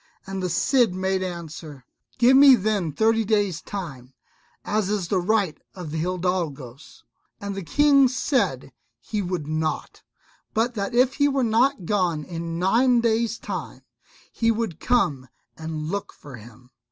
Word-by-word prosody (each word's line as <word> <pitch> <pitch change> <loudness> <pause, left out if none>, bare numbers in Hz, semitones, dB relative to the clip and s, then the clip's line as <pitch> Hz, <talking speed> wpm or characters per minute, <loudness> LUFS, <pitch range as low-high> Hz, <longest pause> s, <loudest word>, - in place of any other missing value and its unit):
And 195 0 -5
the 180 - -1
Cid 230 - +2
made 190 0 -1
answer, 160 -6 -7 0.3
"Give 245 +2 +5
me 275 -1 +9
then 205 -6 -1
thirty 225 +8 +2
days' 205 -5 0
time, 135 -10 -8 0.5
as 210 -2 0
is 205 -4 -2
the 190 - +2
right 195 -3 0 0.2
of 175 -5 -7
the 160 - -3
hidalgos"; 165 -7 -4 0.4
and 200 0 -5
the 195 - -5
King 280 - +4
said 235 - -1 0.3
he 210 -2 -3
would 180 -5 -3
not, 155 +1 -3 0.5
but 230 +3 +1
that 205 +2 -3
if 255 +2 +3
he 285 -1 +4
were 275 -2 0
not 230 -1 +2
gone 175 -6 0
in 165 0 -5
nine 235 +7 +3
days' 230 0 +1
time - - -6 0.5
he 230 - 0
would 225 -7 -1
come 145 - +1 0.3
and 160 -1 -5
look 200 0 -4
for 145 -3 -12
him. 120 +3 -16
190 Hz, 155 wpm, -24 LUFS, 160-230 Hz, 0.5 s, me